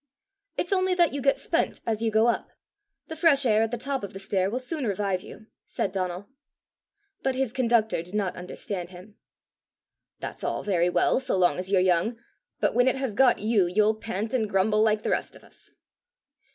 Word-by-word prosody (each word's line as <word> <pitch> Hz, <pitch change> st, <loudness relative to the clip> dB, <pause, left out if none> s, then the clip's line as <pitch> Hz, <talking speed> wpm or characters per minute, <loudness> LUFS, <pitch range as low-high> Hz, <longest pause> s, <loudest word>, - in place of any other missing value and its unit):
"It's 350 Hz, -, 0 dB
only 370 Hz, -1 st, +2 dB
that 345 Hz, -5 st, +3 dB
you 285 Hz, -, -3 dB
get 275 Hz, +1 st, +3 dB
spent -, -, -1 dB
as 220 Hz, -1 st, -1 dB
you 230 Hz, -, +1 dB
go 220 Hz, +1 st, +3 dB
up. 235 Hz, -, 0 dB, 0.6 s
The 320 Hz, -, -6 dB
fresh 295 Hz, -4 st, +3 dB
air 215 Hz, -2 st, +4 dB
at 225 Hz, -, +1 dB
the 240 Hz, -, -3 dB
top 275 Hz, +1 st, -3 dB
of 200 Hz, -, -6 dB
the 195 Hz, -, -7 dB
stair 195 Hz, -1 st, 0 dB
will 235 Hz, -, -2 dB
soon 260 Hz, +1 st, -3 dB
revive 195 Hz, -2 st, -1 dB
you," 215 Hz, +2 st, -12 dB, 0.2 s
said 195 Hz, -, -3 dB
Donal. 185 Hz, 0 st, -3 dB, 0.9 s
But 265 Hz, -1 st, 0 dB
his 260 Hz, -3 st, -1 dB
conductor 230 Hz, -7 st, +2 dB
did 180 Hz, +4 st, -9 dB
not 200 Hz, -3 st, -1 dB
understand 180 Hz, 0 st, -6 dB
him. 190 Hz, +4 st, -14 dB, 1.0 s
"That's -, -, -7 dB
all -, -, -2 dB
very 180 Hz, -3 st, +1 dB
well 180 Hz, -, +2 dB
so 260 Hz, -7 st, -1 dB
long 180 Hz, -1 st, +2 dB
as 185 Hz, +1 st, -3 dB
you're 195 Hz, -2 st, +3 dB
young; 185 Hz, +6 st, +1 dB, 0.4 s
but -, -, +1 dB
when 245 Hz, +1 st, +3 dB
it 260 Hz, -, +3 dB
has 265 Hz, -4 st, -3 dB
got 250 Hz, 0 st, +4 dB
you, 210 Hz, -4 st, +2 dB
you'll 210 Hz, +4 st, +3 dB
pant 220 Hz, 0 st, -4 dB
and 220 Hz, -5 st, 0 dB
grumble 210 Hz, +3 st, +2 dB
like 215 Hz, -1 st, +2 dB
the -, -, -1 dB
rest -, -, -2 dB
of -, -, -16 dB
us." -, -, -16 dB
215 Hz, 205 wpm, -26 LUFS, 190-255 Hz, 1.0 s, air